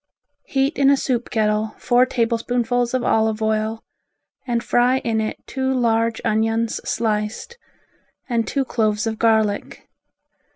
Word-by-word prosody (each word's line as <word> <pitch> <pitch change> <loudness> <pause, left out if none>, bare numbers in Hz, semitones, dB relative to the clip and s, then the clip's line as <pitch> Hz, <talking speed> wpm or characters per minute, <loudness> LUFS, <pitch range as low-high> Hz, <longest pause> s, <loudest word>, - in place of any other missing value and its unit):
Heat 270 +2 0
in 275 -1 +5
a 280 - +5
soup 245 -3 -2
kettle 215 -1 0
four 245 +1 +3
tablespoonfuls 240 +1 0
of 255 - 0
olive 220 0 +1
oil 220 0 -1 0.6
and 235 -1 0
fry 245 +2 +3
in 225 -3 -1
it 215 - -3
two 265 0 -2
large 230 -2 +1
onions 225 +1 0
sliced, 215 - -2 0.7
and 235 -3 0
two 275 -2 -1
cloves 215 -2 0
of 220 -1 -3
garlic. 220 -3 0
230 Hz, 130 wpm, -21 LUFS, 220-245 Hz, 0.7 s, in